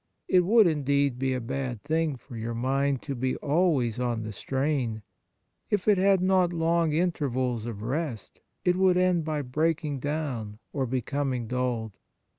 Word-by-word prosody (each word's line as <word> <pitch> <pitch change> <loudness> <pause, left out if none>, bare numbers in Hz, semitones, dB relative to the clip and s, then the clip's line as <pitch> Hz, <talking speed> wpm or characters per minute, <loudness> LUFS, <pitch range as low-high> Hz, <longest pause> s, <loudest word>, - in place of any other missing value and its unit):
It 185 - +5
would, 210 +5 +5
indeed, 140 -5 +1
be 135 0 0
a - - -1
bad 125 -1 -4
thing 160 -1 0
for 125 0 -12
your 115 +1 -4
mind 135 +2 0
to 140 - -4
be 130 0 -1
always 140 -7 +1
on 120 -3 -1
the 110 0 -6
strain; 130 -2 -1 0.7
if 205 -2 0
it 205 -3 +5
had 195 -1 +4
not 185 -1 +3
long 165 -1 +1
intervals 130 -8 0
of 105 -3 -6
rest, 130 -3 -4 0.2
it 180 - +4
would 185 -1 +4
end 180 -2 +3
by 155 -2 -2
breaking 150 +2 -1
down 130 -8 -3 0.2
or 135 -3 -1
becoming 130 0 -1
dulled. 120 -3 -2
140 Hz, 160 wpm, -27 LUFS, 125-165 Hz, 0.7 s, It